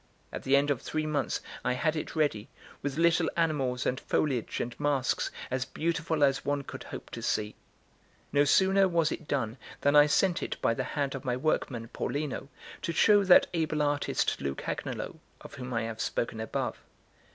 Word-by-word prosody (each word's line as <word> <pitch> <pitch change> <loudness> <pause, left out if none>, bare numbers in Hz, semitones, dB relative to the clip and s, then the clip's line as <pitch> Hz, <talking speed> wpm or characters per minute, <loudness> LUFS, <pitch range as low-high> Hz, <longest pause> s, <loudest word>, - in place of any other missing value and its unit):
At - - -4
the 135 - +3
end 140 +1 +3
of 135 - -1
three 155 0 -2
months 150 -3 -1 0.2
I - - +1
had 155 +5 0
it 155 - -4
ready, 145 -9 0 0.3
with 145 0 -3
little 170 0 +3
animals 135 -7 0
and 130 - 0
foliage 130 -7 -1
and 120 0 -3
masks, 145 -3 +1 0.2
as 130 0 0
beautiful 160 +1 -1
as 135 -1 +3
one 145 0 -1
could - - -8
hope - - -8
to - - -6
see. 105 0 -1 0.8
No 145 0 +5
sooner 190 +6 +4
was 165 -3 +2
it 155 - -5
done 125 -4 -1 0.2
than 145 +1 +3
I 145 0 +8
sent 175 +4 +2
it - - -4
by 115 - +2
the 130 - -2
hand 140 -2 0
of 135 - -6
my 125 -1 -1
workman, 125 -4 -1
Paulino, 140 +1 -3 0.3
to - - -2
show 205 +5 +5
that 185 - +8
able 155 -3 0
artist 145 0 0
Lucagnolo, 70 0 -4 0.2
of - - -11
whom 125 -2 -7
I 115 -2 0
have 115 -1 -4
spoken 115 -1 -2
above. 110 - -3
145 Hz, 185 wpm, -29 LUFS, 125-155 Hz, 0.8 s, I